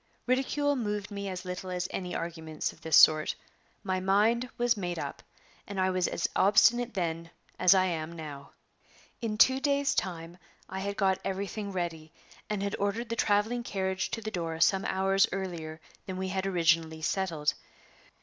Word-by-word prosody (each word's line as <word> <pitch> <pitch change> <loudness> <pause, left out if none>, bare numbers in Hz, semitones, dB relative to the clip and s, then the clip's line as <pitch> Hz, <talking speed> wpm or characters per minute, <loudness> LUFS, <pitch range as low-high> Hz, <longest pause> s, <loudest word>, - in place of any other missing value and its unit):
Ridicule 275 +3 +1
moved 210 -4 -3
me 200 -1 -4
as 185 0 -6
little 180 +1 -5
as 180 0 -2
any 180 -1 -4
arguments 160 -2 -4
of 160 - -21
this 160 -1 +2
sort; 155 0 +6 0.5
my 185 0 -1
mind 215 +6 +2
was 240 0 +2
made 175 -4 -3
up, - - -5 0.5
and 200 -1 -5
I 185 0 +2
was 185 -1 +1
as - - -1
obstinate 230 +4 +4
then 165 -2 -2 0.3
as 185 +2 +6
I 185 0 +4
am 165 -2 -3
now. 150 -4 -8 0.7
In 220 -2 -2
two 260 +4 +6
days' 280 0 +1
time 170 -1 -3 0.3
I 190 - -5
had 200 +1 -3
got 190 -1 +2
everything 200 +1 -3
ready, 165 -4 -4 0.4
and 210 -2 -1
had 200 - -1
ordered 215 +4 -1
the 230 - -1
traveling 220 +2 +1
carriage 190 -4 -2
to 225 - -4
the 215 - -4
door 165 -4 -3
some 190 +3 +3
hours 195 +1 +3
earlier 170 -5 -5 0.3
than 185 -1 -4
we 190 0 -2
had 190 +1 -1
originally 165 -3 +1
settled. 165 -5 0
190 Hz, 170 wpm, -29 LUFS, 170-205 Hz, 0.7 s, sort